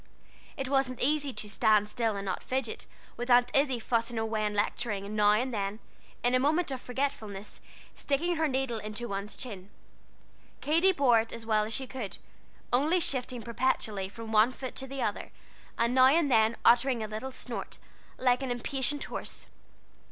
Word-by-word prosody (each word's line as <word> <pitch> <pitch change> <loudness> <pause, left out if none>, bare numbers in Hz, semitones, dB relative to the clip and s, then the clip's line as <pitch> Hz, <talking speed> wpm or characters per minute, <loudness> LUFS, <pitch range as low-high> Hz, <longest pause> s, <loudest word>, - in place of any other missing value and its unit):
It 270 -2 -3
wasn't 270 -2 +1
easy 290 0 +1
to 215 - -3
"stand 210 0 +3
still 225 -1 -1
and 200 0 -4
not 190 -2 -2
fidget," 255 -3 -3 0.3
with 240 +2 -4
Aunt 245 0 +5
Izzie 275 -2 +3
fussing 230 0 -1
away 220 -1 -1
and 210 0 -1
lecturing, 205 -1 -1
and 210 +1 -6
now 210 -1 +5
and 250 +4 0
then, 200 -1 -2 0.5
in 245 +1 +2
a 255 - +4
moment 305 +4 +1
of 260 -2 -4
forgetfulness, 225 -6 -4 0.3
sticking 330 +5 -1
her 320 0 +2
needle 260 -4 -1
into 215 +3 -5
one's 200 0 -4
chin. 200 -6 -7 0.9
Katy 330 +6 +3
bore 270 -9 +4
it 225 0 -3
as 230 -1 -7
well 215 -1 +2
as 220 - -4
she 265 - -2
could, 250 -6 -5 0.6
only 305 +8 +3
shifting 250 -6 0
perpetually 220 -5 -1
from 225 +2 -8
one 220 +3 +5
foot 260 0 -7
to 265 - -2
the 270 0 -4
other, - - -2 0.5
and 235 +1 +1
now 260 0 +7
and 290 0 +3
then 220 0 +4
uttering 240 -1 +4
a - - -3
little 220 +5 -5
snort, 250 -2 -5 0.4
like 250 0 +2
an 265 - -3
impatient 265 +4 0
horse. - - -5
245 Hz, 180 wpm, -29 LUFS, 215-265 Hz, 0.9 s, now